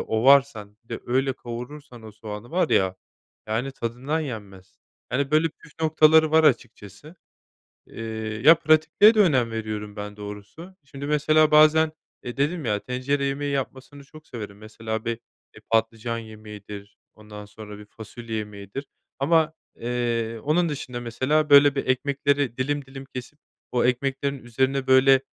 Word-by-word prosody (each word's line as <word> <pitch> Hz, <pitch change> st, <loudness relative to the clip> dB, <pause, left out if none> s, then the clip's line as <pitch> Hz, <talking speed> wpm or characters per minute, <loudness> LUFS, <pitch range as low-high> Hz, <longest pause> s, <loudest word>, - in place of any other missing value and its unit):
ovarsan 115 Hz, -3 st, +3 dB
bir -, -, -36 dB
de -, -, -5 dB
öyle 130 Hz, +2 st, +1 dB
kavurursan 125 Hz, +1 st, -9 dB
o 110 Hz, -1 st, -11 dB
soğanı 105 Hz, +1 st, -9 dB
var 175 Hz, -1 st, +1 dB
ya, 95 Hz, -1 st, +2 dB, 0.5 s
yani 115 Hz, +5 st, -2 dB
tadından 130 Hz, +6 st, -3 dB
yenmez. 100 Hz, -8 st, -8 dB, 0.3 s
Hani 140 Hz, +2 st, -1 dB
böyle 155 Hz, +2 st, +3 dB
püf 150 Hz, 0 st, -19 dB
noktaları 155 Hz, 0 st, +5 dB
var 160 Hz, 0 st, +4 dB
açıkçası. 120 Hz, -, -1 dB, 0.7 s
Eee, 115 Hz, -, -9 dB, 0.4 s
ya, 160 Hz, -, +10 dB
pratikliğe 160 Hz, +7 st, +4 dB
de 215 Hz, -, +3 dB
önem 130 Hz, -, +3 dB
veriyorum 105 Hz, -2 st, -5 dB
ben 105 Hz, 0 st, -7 dB
doğrusu. 105 Hz, -, -10 dB
Şimdi 140 Hz, +1 st, -8 dB
mesela 155 Hz, +1 st, +3 dB
bazen, 155 Hz, +1 st, +5 dB, 0.3 s
eee, 120 Hz, -, -7 dB
dedim 150 Hz, +3 st, -1 dB
ya 105 Hz, -3 st, 0 dB
tencere 135 Hz, +3 st, -2 dB
yemeği 140 Hz, +1 st, -2 dB
yapmasını 135 Hz, +1 st, -5 dB
çok 155 Hz, +2 st, -16 dB
severim. 105 Hz, -4 st, -8 dB
Mesela 110 Hz, +1 st, -6 dB
bir 115 Hz, -1 st, -2 dB, 0.4 s
e, -, -, -14 dB
patlıcan 115 Hz, +1 st, 0 dB
yemeğidir, 105 Hz, -2 st, -11 dB, 0.2 s
ondan 105 Hz, -1 st, -11 dB
sonra 105 Hz, 0 st, -11 dB
bir 105 Hz, -, -12 dB
fasulye 115 Hz, +2 st, -8 dB
yemeğidir 105 Hz, +5 st, -7 dB, 0.3 s
ama, 160 Hz, +3 st, +2 dB, 0.2 s
eee, 115 Hz, -1 st, -2 dB
onun 165 Hz, +4 st, +2 dB
dışında 130 Hz, -5 st, -5 dB
mesela, 130 Hz, +6 st, 0 dB
böyle, 140 Hz, 0 st, +7 dB
bir 135 Hz, -, -3 dB
ekmekleri 140 Hz, -1 st, 0 dB
dilim 145 Hz, +2 st, -2 dB
dilim 135 Hz, 0 st, -10 dB
kesip 135 Hz, +2 st, -9 dB, 0.3 s
o 125 Hz, -, +1 dB
ekmeklerin 135 Hz, +2 st, -1 dB
üzerine 130 Hz, +3 st, -1 dB
böyle, 130 Hz, 0 st, +6 dB
130 Hz, 145 wpm, -24 LUFS, 110-145 Hz, 0.7 s, ya